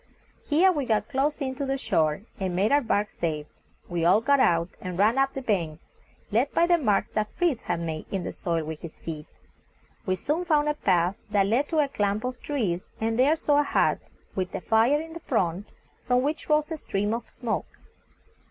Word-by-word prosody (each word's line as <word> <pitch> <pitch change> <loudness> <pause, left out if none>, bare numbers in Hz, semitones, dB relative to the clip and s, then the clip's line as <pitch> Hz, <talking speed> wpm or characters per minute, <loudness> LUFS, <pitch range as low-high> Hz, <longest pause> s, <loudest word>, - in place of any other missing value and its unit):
Here 340 +5 +4
we 290 -6 -1
got 215 -3 0
close 285 +2 0
in 265 -3 -2
to 280 +1 -3
the 270 0 0
shore, 165 - +1 0.2
and 185 -2 -2
made 200 +4 +2
our 290 +1 +5
bark 210 -4 +1
safe. 155 -6 -3 0.4
We 175 -2 -2
all 180 +5 +5
got 280 +5 +3
out, 170 -6 +3
and 180 -1 -5
ran 220 +7 +3
up 270 0 +2
the 270 - -5
banks, 170 -9 -1 0.5
led 240 +7 +2
by 335 - +4
the 345 0 +3
marks 215 -9 +1
that 210 0 -1
Fritz 335 -9 0
had - - -1
made 160 -2 -4
in 190 -2 -2
the - - -4
soil 165 -2 -1
with 155 0 -6
his 165 - -8
feet. 155 -2 -6 0.8
We 185 - +2
soon 300 - -1
found 300 -4 +2
a - - +2
path 185 - +1
that 200 -1 +3
led 240 +8 +1
to 325 - -1
a 295 -2 +4
clump 205 -4 -1
of 250 0 -4
trees, 205 -12 -2
and 225 +1 -1
there 285 +5 +5
saw 295 -2 +2
a - - +4
hut, - - +2 0.3
with 185 0 -3
a 195 - -3
fire 230 +8 +3
in 325 +1 -7
front, 195 - -1 0.4
from 250 0 +3
which 300 +3 -2
rose 300 +1 +2
a 320 - -3
stream 205 -2 -1
of 235 - -4
smoke. - - -3
225 Hz, 210 wpm, -26 LUFS, 185-285 Hz, 0.8 s, our